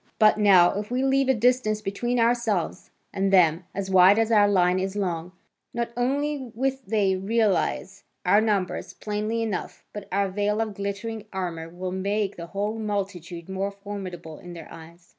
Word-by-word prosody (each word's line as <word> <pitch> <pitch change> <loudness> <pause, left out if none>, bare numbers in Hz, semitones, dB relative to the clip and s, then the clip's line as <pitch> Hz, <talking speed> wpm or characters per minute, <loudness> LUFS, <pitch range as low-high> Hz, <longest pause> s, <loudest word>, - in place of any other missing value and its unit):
But 215 -1 +5
now, 190 -4 +6
if 210 - -6
we 250 +2 0
leave 270 0 +2
a - - +6
distance 235 -2 +2
between 225 +4 -2
ourselves 230 -7 0 0.2
and 195 0 0
them 175 -2 +4
as 195 0 -3
wide 190 +2 +7
as 225 0 +2
our 205 -2 +6
line 180 -2 +3
is 190 +1 -3
long, 180 -4 -2 0.4
not 235 0 -2
only 270 +1 -1
with 265 +1 -2
they 200 -2 +2
realise 200 -1 0 0.2
our 205 +4 +5
numbers 205 -4 -1
plainly 215 +2 -2
enough, 210 -5 -4
but 210 -1 -7
our 200 +1 +1
veil 205 +2 0
of 220 -2 -1
glittering 200 +2 -5
armour 170 -4 -4
will 180 +2 -5
make 200 +2 -1
the 170 0 -8
whole 205 +4 -3
multitude 190 -5 -4
more 190 +1 -2
formidable 195 -5 -8
in 175 -1 -10
their 170 - -10
eyes. 170 +2 -14
200 Hz, 170 wpm, -25 LUFS, 185-225 Hz, 0.4 s, wide